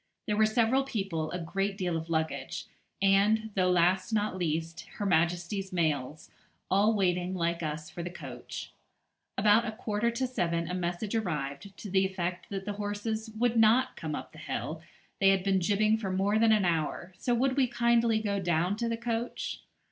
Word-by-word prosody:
There 210 - 0
were 215 +1 +4
several 235 +4 +3
people, 195 -12 -2
a 180 - -3
great 195 +4 -2
deal 180 -3 -1
of 165 0 -4
luggage, 160 -4 -2 0.4
and, 210 +3 +3
though 185 -2 +2
last 180 +4 +3
not 210 -3 0
least, 165 -1 -2
Her 205 - -3
Majesty's 175 +2 +1
mails, 155 -4 -1 0.4
all 205 +3 +4
waiting, 180 -2 +1
like 170 -1 -1
us, 155 0 -4
for 170 - -6
the 175 - -4
coach. 175 - -8 0.7
About 210 +3 +4
a - - -2
quarter 215 0 -1
to 235 +3 -1
seven 170 -9 -1
a 180 - -3
message 180 +4 -2
arrived, 160 -4 -3
to - - -7
the 190 0 +4
effect 185 -2 -3
that 195 -1 -4
the 205 - -2
horses 210 +2 -3
would 240 0 +2
not 225 +3 +4
come - - -4
up - - -7
the - - -13
hill, - - -4 0.4
they 195 - +5
had 195 -1 +3
been 195 -1 +2
jibbing 215 +4 +2
for 200 -4 -3
more 195 +3 +1
than 225 0 +5
an 210 -3 +4
hour, 170 +2 -1
so 245 - +1
would 260 +2 +1
we 270 -2 +3
kindly 235 -2 +3
go 200 -2 -1
down 175 +1 +1
to 235 0 -1
the 230 - -1
coach. 235 0 -3
195 Hz, 185 wpm, -30 LUFS, 175-220 Hz, 0.7 s, they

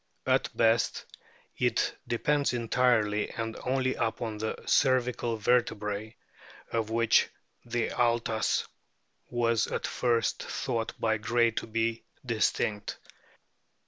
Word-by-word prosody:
At - - +2
best 115 0 +2 0.5
it - - +1
depends 140 +4 +1
entirely 115 -3 +2
and 115 0 -4
only 130 0 +1
upon 110 -1 -2
the 110 0 -2
cervical 125 -3 +2
vertebrae, 110 -2 0 0.6
of 115 -2 -1
which 115 0 +3 0.4
the 120 -1 -1
altas 115 -2 +1 0.6
was 115 -2 +1
at - - -3
first 115 -2 0
thought 115 -1 -3
by 110 -1 +1
Gray 115 +2 +2
to 110 - -4
be 115 0 -1 0.2
distinct. 105 -2 0
115 Hz, 105 wpm, -29 LUFS, 110-120 Hz, 0.6 s, which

